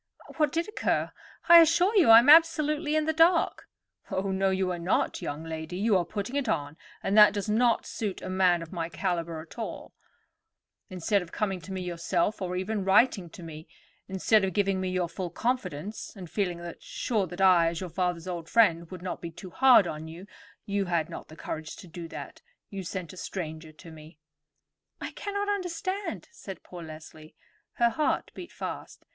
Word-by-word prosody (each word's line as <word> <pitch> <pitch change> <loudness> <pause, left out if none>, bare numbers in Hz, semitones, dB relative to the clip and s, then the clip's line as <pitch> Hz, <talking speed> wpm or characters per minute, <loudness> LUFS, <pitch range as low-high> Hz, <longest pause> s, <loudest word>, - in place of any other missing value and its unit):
What 305 -2 +2
did 335 +3 -1
occur? 425 - -1 0.4
I 340 0 +10
assure 350 +6 +3
you 360 - +5
I 225 - +11
am 240 +3 +5
absolutely 305 -1 +5
in 310 -1 +2
the 315 - +1
dark." 330 +2 +3 0.4
"Oh, 195 +1 -2
no, 190 0 +1
you 190 -1 0
are 175 - -4
not, 170 +2 0
young 145 +2 -5
lady. 160 +2 -6
You 210 +1 +2
are 180 -2 +2
putting 210 +7 -5
it 285 -2 -1
on, 145 +1 -2 0.3
and 195 - 0
that 210 -1 +8
does 205 -1 -3
not 230 +2 +2
suit 205 -4 -4
a - - -7
man 185 -2 +2
of 165 - -12
my 165 -2 -3
caliber 170 -3 -3
at 165 +8 -13
all. 225 - -6 1.0
Instead 190 +2 0
of 175 -1 -10
coming 195 -4 -2
to 190 - -10
me 190 -1 -4
yourself, 175 +3 -1
or 180 -1 -3
even 195 +2 -2
writing 195 -2 +3
to 175 - -12
me—instead 185 +6 -2
of 190 -2 -1
giving 195 -1 +1
me 185 - -2
your 185 -1 -1
full 180 +1 -5
confidence, 215 - -3
and 180 -5 -10
feeling 175 -4 -2
sure 210 -6 -2
that 175 +3 -9
I, 180 -3 +5
as 165 0 -2
your 185 - -5
father's 175 -1 -2
old 170 -3 -5
friend, 170 -7 +3
would 185 -2 -9
not 185 - -5
be 170 - -5
too 180 +3 -11
hard 255 -2 +6
on 155 -1 -5
you—you 195 +3 -6
had 170 -3 -1
not - - -8
the 155 - -13
courage 160 -1 -6
to 185 - -12
do 170 0 -8
that—you 200 - -10
sent 185 -1 -6
a - - -13
stranger 160 -4 -6
to 165 +2 -13
me." 155 0 -14 0.8
"I - - -5
cannot 405 0 -4
understand," 375 0 -3
said 195 - -10
poor 175 -1 -10
Leslie. 155 -1 -11 0.4
Her 235 0 +2
heart 305 +6 -1
beat 350 - -9
fast. - - -7
190 Hz, 190 wpm, -28 LUFS, 170-230 Hz, 1.0 s, I